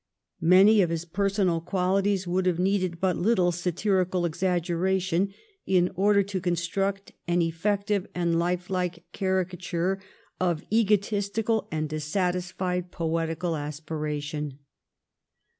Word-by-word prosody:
Many 195 Hz, +5 st, +6 dB
of 175 Hz, -, +2 dB
his 165 Hz, 0 st, -2 dB
personal 190 Hz, -1 st, 0 dB
qualities 190 Hz, +2 st, +1 dB
would 185 Hz, +1 st, +1 dB
have 175 Hz, -2 st, +2 dB
needed 185 Hz, -2 st, 0 dB
but 185 Hz, -1 st, +1 dB
little 185 Hz, -3 st, +3 dB
satirical 180 Hz, +1 st, 0 dB
exaggeration 180 Hz, +2 st, 0 dB, 0.4 s
in 180 Hz, -1 st, +3 dB
order 200 Hz, +1 st, +3 dB
to 195 Hz, -1 st, -4 dB
construct 190 Hz, +3 st, -1 dB, 0.2 s
an 175 Hz, 0 st, +2 dB
effective 200 Hz, +4 st, 0 dB
and 170 Hz, -1 st, +1 dB
life 180 Hz, +1 st, -1 dB
like 180 Hz, -2 st, -2 dB
caricature 185 Hz, 0 st, -1 dB, 0.4 s
of 175 Hz, -4 st, 0 dB
egotistical 210 Hz, +1 st, +1 dB
and 155 Hz, -1 st, -1 dB
dissatisfied 180 Hz, +3 st, -2 dB
poetical 165 Hz, +1 st, -1 dB
aspiration. 150 Hz, -1 st, -4 dB
180 Hz, 110 wpm, -27 LUFS, 170-195 Hz, 0.4 s, Many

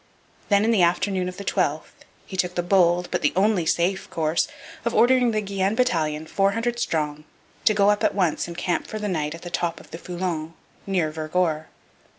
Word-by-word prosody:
Then, 200 Hz, 0 st, +4 dB
in 230 Hz, -, +3 dB
the 215 Hz, -5 st, +3 dB
afternoon 180 Hz, +1 st, +1 dB
of 180 Hz, -, -10 dB
the 200 Hz, -, -7 dB
12th, 155 Hz, -6 st, -2 dB, 0.2 s
he 190 Hz, -, -8 dB
took 180 Hz, -1 st, -1 dB
the 175 Hz, -, 0 dB
bold 175 Hz, -1 st, +3 dB
but -, -, 0 dB
the 150 Hz, -, +2 dB
only 190 Hz, -3 st, +2 dB
safe 185 Hz, +4 st, 0 dB
course 160 Hz, 0 st, 0 dB, 0.4 s
of 235 Hz, -, -1 dB
ordering 245 Hz, +2 st, +5 dB
the 215 Hz, -1 st, 0 dB
Guienne 195 Hz, 0 st, -1 dB
battalion, 160 Hz, -10 st, 0 dB
four 195 Hz, +4 st, +1 dB
hundred 235 Hz, +2 st, -1 dB
strong, 150 Hz, -6 st, -1 dB, 0.4 s
to 215 Hz, -, +4 dB
go 205 Hz, 0 st, +5 dB
up 210 Hz, -, -1 dB
at -, -, +2 dB
once 180 Hz, -6 st, +1 dB
and 170 Hz, 0 st, -8 dB
camp 175 Hz, -, -1 dB
for 215 Hz, -, -5 dB
the 210 Hz, -1 st, -3 dB
night 155 Hz, -4 st, -2 dB
at 165 Hz, -, -12 dB
the 175 Hz, -, -7 dB
top 175 Hz, -1 st, -1 dB
of -, -, -17 dB
the 165 Hz, -, -7 dB
Foulon, 175 Hz, -3 st, -4 dB, 0.3 s
near 180 Hz, -5 st, 0 dB
Vergor. 155 Hz, 0 st, -1 dB
180 Hz, 205 wpm, -24 LUFS, 165-200 Hz, 0.4 s, ordering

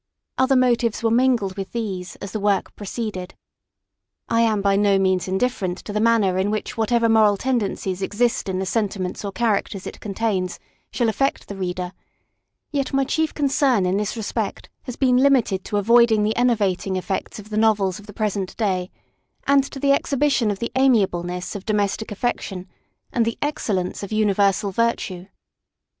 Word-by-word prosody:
Other 260 Hz, +1 st, +4 dB
motives 240 Hz, -3 st, +2 dB
were 225 Hz, -, +2 dB
mingled 235 Hz, -6 st, +2 dB
with 195 Hz, -1 st, -6 dB
these 195 Hz, -6 st, -4 dB
as 200 Hz, -, -8 dB
the 215 Hz, -, -3 dB
work 200 Hz, -1 st, 0 dB
proceeded. 205 Hz, -3 st, -5 dB, 0.9 s
I 230 Hz, -, +3 dB
am 220 Hz, -2 st, +2 dB
by 200 Hz, -1 st, +3 dB
no 200 Hz, -1 st, +3 dB
means 185 Hz, -2 st, +1 dB
indifferent 190 Hz, -2 st, -1 dB
to 205 Hz, -, -5 dB
the 210 Hz, -, 0 dB
manner 215 Hz, -5 st, +3 dB
in 195 Hz, +2 st, +1 dB
which 215 Hz, +3 st, -3 dB
whatever 230 Hz, +1 st, +2 dB
moral 215 Hz, -2 st, +4 dB
tendencies 200 Hz, -6 st, -1 dB
exist 215 Hz, +2 st, 0 dB
in 185 Hz, -, -1 dB
the 190 Hz, -, -1 dB
sentiments 195 Hz, -2 st, -2 dB
or 200 Hz, -, -3 dB
characters 200 Hz, -2 st, -1 dB
it -, -, -7 dB
contains 195 Hz, -3 st, -2 dB, 0.3 s
shall 240 Hz, -, 0 dB
affect 270 Hz, +6 st, 0 dB
the 200 Hz, -, -6 dB
reader; 180 Hz, -1 st, -3 dB, 0.8 s
yet 280 Hz, -3 st, -2 dB
my 275 Hz, -, +3 dB
chief 315 Hz, +3 st, 0 dB
concern 275 Hz, -, +2 dB
in 185 Hz, +2 st, +1 dB
this 210 Hz, +3 st, -2 dB
respect 220 Hz, -, -3 dB, 0.2 s
has 250 Hz, -4 st, -5 dB
been 255 Hz, -2 st, +3 dB
limited 255 Hz, -8 st, +3 dB
to -, -, -10 dB
the -, -, +3 dB
avoiding 225 Hz, +1 st, +4 dB
the 215 Hz, +1 st, 0 dB
enervating 205 Hz, -6 st, +1 dB
effects 185 Hz, +1 st, -3 dB
of 210 Hz, 0 st, -11 dB
the -, -, -3 dB
novels 210 Hz, -4 st, +2 dB
of 210 Hz, -, -15 dB
the -, -, -9 dB
present 205 Hz, -3 st, -3 dB
day, 185 Hz, -4 st, 0 dB, 0.6 s
and 280 Hz, -1 st, +4 dB
to 275 Hz, -, -8 dB
the 280 Hz, 0 st, +3 dB
exhibition 275 Hz, -4 st, +1 dB
of 205 Hz, -, -1 dB
the 235 Hz, +3 st, -4 dB
amiableness 185 Hz, -9 st, +1 dB
of 200 Hz, -, -6 dB
domestic 210 Hz, +1 st, -1 dB
affection, 200 Hz, -4 st, -3 dB, 0.5 s
and 235 Hz, -, +2 dB
the 230 Hz, 0 st, -2 dB
excellence 205 Hz, -11 st, -2 dB
of 200 Hz, -, -7 dB
universal 205 Hz, -1 st, +2 dB
virtue. 190 Hz, -4 st, -1 dB
210 Hz, 175 wpm, -22 LUFS, 190-235 Hz, 0.9 s, Other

